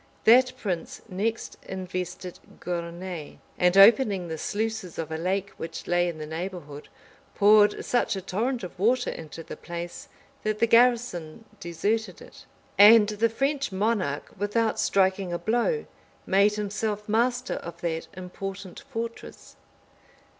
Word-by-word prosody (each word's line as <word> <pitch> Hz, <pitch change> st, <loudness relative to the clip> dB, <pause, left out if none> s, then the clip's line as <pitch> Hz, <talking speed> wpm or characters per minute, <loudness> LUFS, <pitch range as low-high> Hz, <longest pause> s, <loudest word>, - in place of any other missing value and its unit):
That 255 Hz, +3 st, +6 dB
prince 185 Hz, -8 st, -4 dB
next 215 Hz, +4 st, -3 dB
invested 185 Hz, -1 st, -6 dB, 0.2 s
Gournai; 170 Hz, -2 st, -5 dB, 0.2 s
and 180 Hz, +1 st, +3 dB
opening 200 Hz, -3 st, +6 dB
the 160 Hz, -1 st, -5 dB
sluices 215 Hz, -3 st, -3 dB
of 160 Hz, -1 st, -4 dB
a -, -, -2 dB
lake 190 Hz, +4 st, -2 dB
which 165 Hz, -, -7 dB
lay 175 Hz, 0 st, +2 dB
in 165 Hz, -, -6 dB
the 155 Hz, -, -6 dB
neighborhood, 160 Hz, -3 st, -7 dB, 0.5 s
poured 210 Hz, 0 st, +5 dB
such 240 Hz, -3 st, +1 dB
a 190 Hz, -, -4 dB
torrent 230 Hz, +6 st, -2 dB
of 180 Hz, -, -8 dB
water 245 Hz, +5 st, +2 dB
into 165 Hz, +1 st, -9 dB
the -, -, -8 dB
place, 175 Hz, +10 st, -7 dB, 0.3 s
that 215 Hz, 0 st, -1 dB
the 230 Hz, -, +3 dB
garrison 230 Hz, -6 st, +2 dB
deserted 185 Hz, +4 st, -2 dB
it, -, -, -15 dB, 0.3 s
and 210 Hz, +1 st, +8 dB
the 215 Hz, +2 st, +1 dB
French 275 Hz, +2 st, -1 dB
monarch, 190 Hz, -7 st, -1 dB
without 215 Hz, +3 st, 0 dB
striking 190 Hz, -1 st, +1 dB
a 175 Hz, -, -1 dB
blow, 240 Hz, -, 0 dB, 0.4 s
made 200 Hz, +2 st, +3 dB
himself 210 Hz, 0 st, -3 dB
master 245 Hz, +4 st, 0 dB
of 170 Hz, -, -8 dB
that 165 Hz, -1 st, -3 dB
important 190 Hz, +1 st, -7 dB
fortress. 230 Hz, -4 st, -7 dB
200 Hz, 135 wpm, -26 LUFS, 175-225 Hz, 0.5 s, and